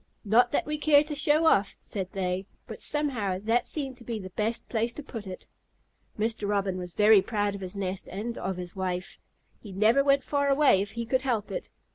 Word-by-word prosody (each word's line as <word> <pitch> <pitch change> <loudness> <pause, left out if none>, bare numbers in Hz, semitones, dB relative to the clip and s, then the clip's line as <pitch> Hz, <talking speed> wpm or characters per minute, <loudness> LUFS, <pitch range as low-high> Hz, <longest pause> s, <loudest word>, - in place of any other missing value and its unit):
"Not 240 +4 +4
that - - 0
we 300 0 -3
care 295 -1 +5
to 300 0 -5
show 295 +2 +3
off," 200 -10 +3
said 190 -3 -4
they, 190 0 -2 0.2
"but - - -9
somehow 250 -11 0
that 230 +3 +1
seemed 270 -4 -4
to 245 - -13
be 235 -1 -4
the 185 -3 -8
best 220 +4 -2
place 230 0 -1
to 300 - -8
put 225 -7 -8
it." 185 - -8 0.7
Mr. 220 -1 -1
Robin 195 -2 0
was 180 -1 -7
very 210 -1 +6
proud 205 0 -1
of 200 - -7
his 185 +1 -5
nest 190 -1 -4
and 220 +5 -4
of 190 0 -3
his 180 -1 -7
wife. 185 -1 -4 0.4
He 205 - -11
never 220 +8 +4
went 275 -1 +3
far 285 0 0
away 275 -8 +4
if 200 0 -5
he 235 0 -4
could 260 +3 +1
help 235 -6 -1
it. - - -5
215 Hz, 215 wpm, -28 LUFS, 195-270 Hz, 0.7 s, very